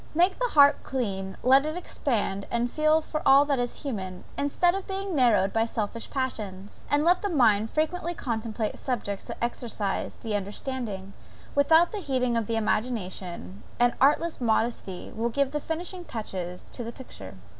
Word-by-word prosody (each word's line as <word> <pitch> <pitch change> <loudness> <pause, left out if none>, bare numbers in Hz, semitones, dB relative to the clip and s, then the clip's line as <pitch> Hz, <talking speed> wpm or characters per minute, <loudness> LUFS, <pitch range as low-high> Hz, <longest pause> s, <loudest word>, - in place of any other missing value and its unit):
Make 360 +3 +3
the - - +2
heart 285 -1 +7
clean, 195 -7 -3
let 265 +2 +6
it 310 +3 -3
expand 210 - -2
and 240 +1 0
feel 310 +1 +3
for 305 0 -4
all 275 +1 +7
that 280 -3 +1
is 245 +4 -3
human, 190 -9 -4
instead 315 +5 +2
of 390 0 -4
being 390 -2 -3
narrowed 215 -8 +4
by 225 0 +2
selfish 225 0 -4
passions; 210 -7 -4
and 290 +2 +3
let 355 +1 +4
the 410 - -1
mind 220 - +3
frequently 340 +4 -1
contemplate 225 -4 -3
subjects 205 -6 -3
that - - -7
exercise 230 -4 -2
the 220 -2 -3
understanding, 205 -1 -4 0.4
without 320 +6 +5
heating 260 - 0
the 230 -1 0
imagination, 190 - -2 0.2
and 245 0 +4
artless 300 +3 +3
modesty 220 -5 -1
will 230 +2 0
give 275 +2 +1
the 295 0 -2
finishing 350 +4 -4
touches 185 - -5
to 245 - -5
the 230 - -5
picture. 100 - -10
245 Hz, 160 wpm, -27 LUFS, 210-295 Hz, 0.4 s, heart